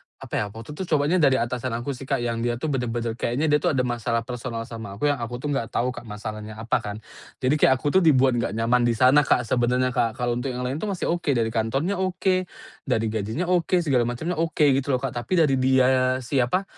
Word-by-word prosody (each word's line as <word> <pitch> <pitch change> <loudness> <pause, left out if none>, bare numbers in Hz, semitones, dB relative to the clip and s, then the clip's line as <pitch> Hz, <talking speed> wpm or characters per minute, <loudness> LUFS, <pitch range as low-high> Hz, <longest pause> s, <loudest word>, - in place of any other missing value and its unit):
apa - - -13
ya, - - 0
waktu 115 +7 -10
itu 180 +4 -5
cobaannya 150 +5 +2
dari 135 -3 +5
atasan 120 +1 -2
aku 120 +4 -3
sih, 135 0 -8
Kak, 135 -3 0
yang 115 -1 -2
dia 120 0 0
tuh 145 +5 -3
bener-bener, 120 -3 -2
kayaknya 120 +5 -1
dia 150 - +4
tuh - - +1
ada 125 - +2
masalah 115 -1 -1
personal 120 -1 -5
sama 115 -3 -8
aku 145 +8 +1
yang 140 - -3
aku 120 +1 -4
tuh 145 - -1
nggak 115 -5 -1
tahu, 125 +1 0
Kak, 120 -2 -10
masalahnya 105 0 -7
apa 115 +2 0
kan. 105 -1 -6 0.5
Jadi 145 +4 +2
kayak 130 - +6
aku 145 +7 +2
tuh - - 0
dibuat 135 -6 +4
nggak 110 - -2
nyaman 120 +1 +2
di 115 - +1
sana, 130 +5 +6
Kak, - - +3
sebenarnya, 125 +2 +1
Kak. 115 -1 0
Kalau 120 -1 -1
untuk 135 +2 -3
yang 125 - -4
lain 135 +4 -2
tuh 215 - -2
masih 185 -3 -2
oke. 170 -3 -2
Dari 115 -2 0
kantornya 135 - -1
oke, 185 0 0 0.4
dari 110 0 +1
gajinya 110 - -2
oke, 180 0 +2
segala 125 -5 +2
macemnya 155 +8 -3
oke 160 -2 +2
gitu 135 0 +1
loh, 125 - -4
Kak. 135 - -2
Tapi 120 +10 -2
dari 135 -2 +2
dia 130 0 +3
siapa, 130 +8 +1
125 Hz, 235 wpm, -24 LUFS, 115-145 Hz, 0.5 s, kayak